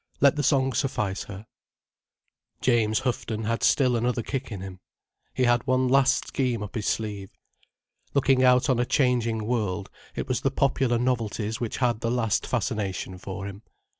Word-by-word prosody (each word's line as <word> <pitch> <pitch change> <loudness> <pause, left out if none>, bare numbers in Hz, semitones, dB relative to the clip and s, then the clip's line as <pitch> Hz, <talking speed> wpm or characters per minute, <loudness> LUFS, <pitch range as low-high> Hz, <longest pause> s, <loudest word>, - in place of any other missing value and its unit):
Let 140 0 +5
the 150 - 0
song 135 -2 +2
suffice 110 -6 -1
her. 100 +1 -9 1.1
James 110 -3 +2
Houghton 115 -3 -2
had 115 +2 -1
still 130 -3 +3
another 120 0 0
kick 130 0 -4
in 100 -3 -5
him. 95 -1 -8 0.6
He 130 - +1
had 120 -1 +2
one 130 0 +2
last 135 0 +3
scheme 125 -5 -1
up 105 - -8
his 105 -3 -3
sleeve. 105 -3 -2 0.9
Looking 135 -1 +4
out 125 +1 +5
on 130 -4 +2
a 120 - +2
changing 115 -5 +1
world, 105 -5 -2 0.2
it - - -3
was 130 0 -1
the 135 - +2
popular 135 -3 +1
novelties 115 -3 -1
which 120 -3 -3
had 120 -4 +1
the 115 - -1
last 115 -2 0
fascination 100 -6 -2
for 95 +1 -6
him. 100 +1 -8
120 Hz, 165 wpm, -26 LUFS, 105-130 Hz, 1.1 s, Let